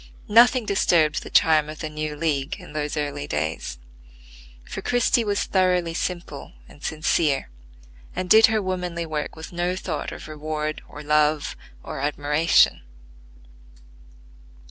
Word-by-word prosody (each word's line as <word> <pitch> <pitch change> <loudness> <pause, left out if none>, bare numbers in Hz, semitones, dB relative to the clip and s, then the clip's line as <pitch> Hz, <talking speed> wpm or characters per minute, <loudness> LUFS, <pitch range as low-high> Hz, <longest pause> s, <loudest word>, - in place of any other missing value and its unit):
Nothing 240 +2 +6
disturbed 170 -6 +2
the - - -9
charm 155 -2 +4
of 155 - -7
the 155 - -4
new 155 0 -4
league 145 -3 -1
in - - -12
those 150 0 -3
early 145 -1 -3
days; 75 -4 -3 0.9
for - - -6
Christie 245 -1 +2
was 205 -1 0
thoroughly 180 -3 +1
simple 170 -4 -5
and 145 - -17
sincere, 155 - 0 0.6
and 185 0 -3
did 220 +4 +8
her 220 -2 0
womanly 180 -2 -3
work 155 -2 -4
with 160 +2 -9
no 175 +1 -1
thought 155 -5 -4
of - - -9
reward 155 0 -4
or 150 - -9
love 150 0 +1 0.3
or - - -6
admiration. 150 +3 +2
155 Hz, 135 wpm, -24 LUFS, 150-180 Hz, 0.9 s, did